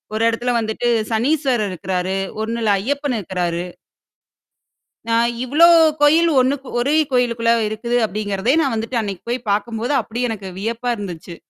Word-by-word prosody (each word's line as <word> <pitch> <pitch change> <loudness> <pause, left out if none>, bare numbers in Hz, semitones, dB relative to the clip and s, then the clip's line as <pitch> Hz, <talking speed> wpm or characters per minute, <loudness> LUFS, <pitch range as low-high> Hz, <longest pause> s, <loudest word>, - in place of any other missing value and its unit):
ஒரு 220 - 0
இடத்துல 235 +2 -1
வந்துட்டு 220 +2 -2 0.2
சனீஸ்வரர் 250 -1 +1
இருக்கறாரு. 185 +2 -2 0.2
ஒண்ணுல 225 0 -1
ஐயப்பன் 285 +3 -2
இருக்கறாரு. 175 -2 -3 1.4
நான் 230 +1 +3 0.2
இவ்ளோ 300 +7 +5 0.3
கோயில் 320 +3 +5
ஒண்ணுக்கு 265 +1 0
ஒரே 280 +5 +1 0.2
கோயிலுக்குள்ள 235 -2 +1 0.2
இருக்குது 235 +3 -2
அப்டிங்கிறதே 205 +3 -1
நான் 275 -5 0
வந்துட்டு 230 +2 -2
அன்னைக்கு 200 -4 -6
போய் 245 0 -3
பார்க்கும்போது 225 +5 -1
அப்டி 235 +2 -6
எனக்கு 200 -4 -5
வியப்பா 230 +4 -2
இருந்துச்சு. 175 -4 -7
230 Hz, 130 wpm, -19 LUFS, 205-250 Hz, 1.4 s, இவ்ளோ